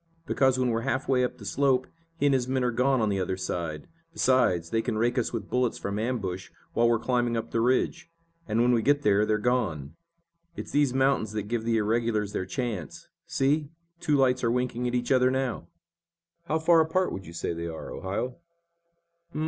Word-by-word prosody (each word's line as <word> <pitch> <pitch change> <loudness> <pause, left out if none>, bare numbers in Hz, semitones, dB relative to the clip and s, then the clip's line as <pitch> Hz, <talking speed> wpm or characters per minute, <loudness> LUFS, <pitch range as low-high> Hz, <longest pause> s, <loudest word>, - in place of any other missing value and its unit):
"Because 130 -4 +2
when 130 -1 +1
we're 115 0 0
half 130 +3 -2
way 130 -1 +3
up 125 - -2
the 105 - -11
slope 130 +3 +2 0.3
he 145 - 0
and 140 - +4
his 125 -2 +1
men 130 0 0
are 125 - +1
gone 130 +2 +2
on 110 - +1
the 100 -1 0
other 95 0 -2
side. 85 -4 -4 0.3
Besides, 110 - +2
they 115 - +2
can 110 - -2
rake 120 +2 +1
us 120 - -1
with 110 -4 -4
bullets 125 -1 +1
from 100 +1 -3
ambush, 105 -6 -3 0.2
while 115 0 +3
we're 120 - +3
climbing 120 0 0
up 115 - -4
the 115 - +1
ridge. 130 +7 +1 0.4
And 115 +2 +2
when 125 - +4
we 120 -2 +3
get 145 +3 +2
there, 105 0 +3
they're 110 - +2
gone. 105 - -1 0.6
It's - - -7
these 145 -2 +3
mountains 135 -4 +1
that 105 -1 -2
give 115 +2 -3
the 115 -1 +2
irregulars 110 -1 0
their 95 - -2
chance. 110 - -5 0.2
See, 145 +2 +1 0.3
two 150 -3 +1
lights 130 -2 +2
are 115 - +3
winking 125 0 -1
at 120 - -1
each 120 +1 -1
other 130 -1 +4
now!" 130 -8 -2 0.8
"How 160 -1 0
far 165 +1 +4
apart 160 +4 +1
would 95 - -6
you 85 - -10
say 85 - -3
they 85 0 -4
are, 80 -1 -7
Ohio?" 100 +7 -4
120 Hz, 205 wpm, -27 LUFS, 105-130 Hz, 0.8 s, and